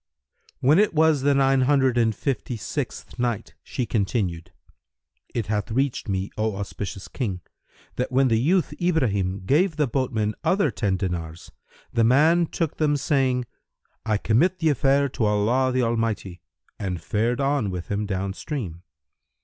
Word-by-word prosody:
When 150 +7 +5
it 210 -5 +2
was 155 -2 +4
the 140 +1 +3
Nine 135 -1 +3
Hundred 130 -1 +3
and 115 -2 +2
Fifty 130 -3 -3
sixth 105 - -5
Night, 120 -4 -2
She 125 - -3
continued, 95 -6 -1 0.8
It 115 -3 -2
hath 105 +1 -2
reached 130 0 -1
me, 95 0 -2
O 110 -1 0
auspicious 100 -1 -6
King, 100 -9 -3 0.6
that 125 - -1
when 130 +1 +3
the 115 -2 +2
youth 175 +8 +2
Ibrahim 100 - +1
gave 160 - +2
the 150 -1 +2
boatman 115 -5 -1
other 165 -3 +2
ten 100 -5 -1
dinars, 85 -3 -4 0.4
the 115 - +3
man 155 +8 +4
took 165 -2 -3
them, 150 -2 +2
saying, 130 -3 +1 0.6
"I 110 -2 +1
commit 160 - +2
the 160 -3 +2
affair 140 0 +3
to 120 - -1
Allah 115 +6 +2
the 130 0 +1
Almighty!" 115 -6 -2 0.4
and 90 -4 -3
fared 110 +9 -1
on 140 -6 +1
with 90 -3 -5
him 105 +1 -1
down 95 -1 -2
stream. 100 - -5
120 Hz, 155 wpm, -24 LUFS, 100-140 Hz, 0.8 s, When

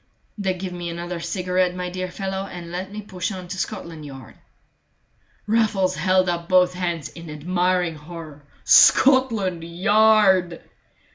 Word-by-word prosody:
"Then 190 -3 -2
give 185 0 -5
me 175 -1 -5
another 170 +1 -5
cigarette, 180 0 -1
my 180 0 -4
dear 185 0 -4
fellow, 190 +1 -4
and 170 -2 -9
let 185 +2 -5
me 210 +1 -7
push 185 -1 -4
on 185 -2 -7
to 185 - -5
Scotland 165 -3 -5
Yard." 135 -4 -11 1.1
Raffles 210 -4 +1
held 185 0 +2
up 170 -1 -3
both 180 -1 +4
hands 175 -4 -3
in 170 -1 -11
admiring 175 +3 0
horror. 155 -1 -10 0.2
"Scotland 225 -11 +4
Yard!" 190 0 +3
180 Hz, 140 wpm, -22 LUFS, 170-190 Hz, 1.1 s, both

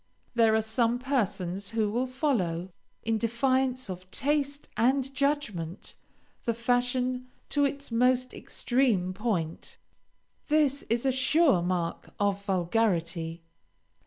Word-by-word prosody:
There 225 -2 +4
are 220 - +2
some 230 +2 +1
persons 200 -8 -1
who 220 -2 0
will 245 +4 0
follow, 200 - -1 0.3
in 225 0 0
defiance 255 +2 +1
of 185 -1 -7
taste 285 +3 0
and 265 +3 +2
judgment, 255 - -2 0.5
the 235 - +1
fashion 250 +1 0 0.2
to 290 -1 +2
its 280 -2 -3
most 250 +2 +2
extreme 230 -8 0
point; 185 -6 -3 0.7
this 295 -2 +3
is 235 +3 +1
a 265 - +4
sure 265 - +3
mark 175 -1 -2
of 200 -1 +1
vulgarity. 170 -4 0
235 Hz, 115 wpm, -28 LUFS, 190-260 Hz, 0.7 s, There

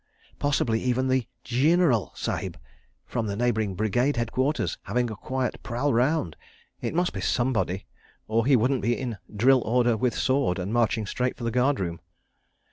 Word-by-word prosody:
Possibly 125 -6 +1
even 130 +1 0
the 130 -2 +1 0.2
"Gineraal" 135 - +3
Sahib - - -3 0.5
(from 115 -3 -2
the 100 - -2
neighbouring 110 -4 0
Brigade 120 +8 +1
Headquarters) 130 +5 -1
having 120 -1 0
a - - -5
quiet 130 +5 -3
prowl 125 +4 -1
round. 125 - +1 0.5
It - - -3
must 175 +1 +1
be 95 - -4
somebody, 110 -5 0 0.4
or 115 +2 +1
he 140 - +6
wouldn't 125 +2 +2
be 120 0 +1
"in 120 -5 -4
drill 125 +5 +4
order 120 +1 +2
with 120 +2 0
sword," 130 -9 +1
and 95 +3 -3
marching 115 -2 +1
straight 125 +5 -2
for 120 - -8
the 115 - 0
guard 130 +4 +2
room. 85 -3 -3
120 Hz, 165 wpm, -26 LUFS, 110-130 Hz, 0.5 s, he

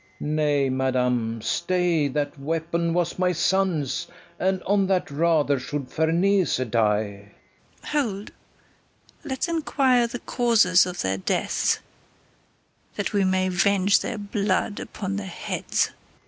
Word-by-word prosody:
Nay, 150 -2 +1
madam, 125 -4 0
stay; 175 -4 +1
that 145 +1 -3
weapon 165 +3 -1
was 175 +1 -1
my 180 -1 +2
son's, 170 -5 0 0.3
And 190 0 0
on 200 0 +2
that 185 -5 0
rather 150 -2 +2
should 140 0 -5
Ferneze 175 +4 +2
die. 105 -3 0 0.5
KATHARINE. 295 -2 0
Hold; 200 +1 -8 0.9
let's 270 +4 -2
inquire 270 -7 +2
the 235 - -5
causers 225 -8 +3
of 180 -1 -4
their 95 0 0
deaths, - - 0 1.1
That - - -3
we 200 -1 +2
may 185 0 +1
venge 195 +2 +3
their 235 - -4
blood 205 0 -1
upon 195 -1 -5
their 200 -1 -5
heads. 175 - -2
180 Hz, 120 wpm, -24 LUFS, 145-200 Hz, 1.1 s, causers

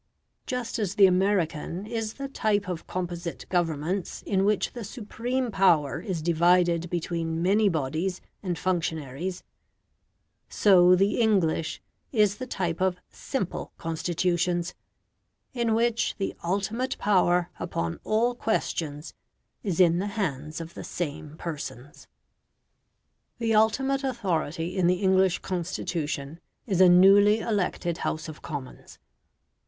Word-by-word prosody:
Just 250 -3 -3
as 200 -3 -1
the 200 -2 +7
American 185 -2 +1
is 225 -1 -3
the 275 0 -5
type 215 -6 0
of 175 -3 -5
composite 175 -2 -4
Governments, 175 +1 -1
in 195 -1 +1
which 210 0 +1
the 240 - -6
supreme 240 +3 -3
power 175 -8 +3
is 180 -7 -4
divided 170 0 +3
between 165 -1 -2
many 205 +3 +4
bodies 160 +4 -2 0.2
and 180 -4 -2
functionaries, 165 -1 -2 1.1
so 185 -3 +6
the 195 +5 +2
English 185 -8 +1 0.3
is 210 -4 +3
the 255 - -6
type 175 -7 -2
of 185 -1 +2
SIMPLE 255 -10 -4
Constitutions, 175 +1 -1 0.8
in 235 -3 +1
which 235 0 +1
the 195 - -3
ultimate 205 +8 -1
power 180 -3 +2
upon 85 - -3
all 230 +3 +2
questions 160 -10 -2 0.5
is 190 -5 -2
in 170 -1 +5
the 200 - -1
hands 155 -5 -2
of 165 0 -8
the - - -8
same 155 -2 -5
persons. 145 -5 -7 1.3
The 230 -1 0
ultimate 265 +6 +2
authority 175 - -2
in 185 -3 +2
the 180 - +4
English 190 -1 +4
Constitution 165 -4 -3 0.3
is 190 -5 +1
a 185 - +8
newly 200 +4 +7
elected 180 -6 -1
House 155 +1 -3
of 155 -1 -9
Commons. 145 -5 -8
180 Hz, 125 wpm, -27 LUFS, 165-210 Hz, 1.3 s, a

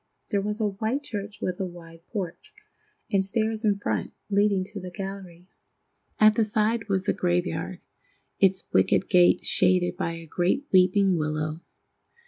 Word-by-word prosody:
There 200 -2 +2
was 210 +2 -3
a 215 -2 +1
white 220 +8 -2
church 205 -5 -6
with 180 -1 -2
a 190 - -1
wide 165 -1 -12
porch, 190 - -6 0.6
and 195 -2 +3
stairs 220 +2 -1
in 205 -2 +2
front, 200 - -2 0.2
leading 200 -1 +3
to 200 +2 -8
the 185 -1 -7
gallery. 185 -2 -8 0.7
At 215 0 +7
the 225 - +2
side 215 +1 0
was 190 -1 +1
the - - +1
graveyard, 175 0 -1 0.6
its 190 -1 +3
wicket - - +3
gate 180 -2 +4
shaded 180 -1 +2
by 170 -2 -2
a 165 0 -8
great 180 - 0
weeping 185 0 +4
willow. 155 +1 -2
195 Hz, 155 wpm, -26 LUFS, 175-210 Hz, 0.7 s, At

